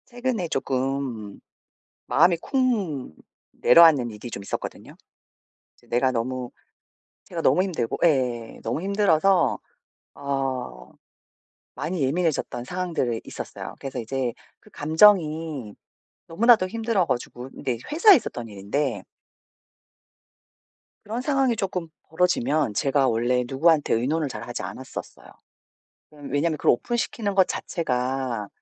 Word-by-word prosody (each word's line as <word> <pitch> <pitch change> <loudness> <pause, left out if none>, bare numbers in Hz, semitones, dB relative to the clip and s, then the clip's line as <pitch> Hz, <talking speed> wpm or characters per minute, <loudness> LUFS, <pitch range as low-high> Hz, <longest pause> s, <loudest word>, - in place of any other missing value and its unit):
최근에 245 -6 -2
조금 130 -6 -2 0.7
마음이 175 -1 +4
쿵 205 - -1 0.4
내려앉는 155 -8 +6
일이 110 +3 -9
좀 100 - -6
있었거든요. 100 - -6 0.8
이제 - - -26
내가 125 +2 +2
너무 125 +1 -3 0.8
제가 170 -2 -5
너무 185 - +3
힘들고 170 -12 -2
예. 125 -7 0
너무 115 +8 -2
힘들어서 195 -2 +2 0.6
어 130 - -4 0.8
많이 175 -2 -3
예민해졌던 140 -4 -1
상황들이 165 -9 -2
있었어요. - - -7
그래서 135 -1 -6
이제 125 +1 -2 0.3
그 - - -20
감정이 155 - +3 0.5
너무나도 215 +2 +4
힘들어 225 -2 0
가지고 125 0 -4
네. 125 -3 -3
회사에서 375 +5 +7
있었던 120 - -5
일인데 105 +5 -2 2.0
그런 225 +4 -3
상황이 270 -3 +1
조금 185 -4 -3 0.2
벌어지면 155 -7 +1
제가 135 +4 +2
원래 120 +2 +1
누구한테 150 +3 +3
의논을 145 +6 0
잘하지 120 +1 -6
않았었어요. 130 +1 -8 0.9
음 145 -2 -10
왜냐하면 155 +3 +1
그걸 - - +4
오픈시키는 220 - -2
것 190 -1 +4
자체가 125 - -2
145 Hz, 280 characters per minute, -24 LUFS, 125-180 Hz, 2.0 s, 회사에서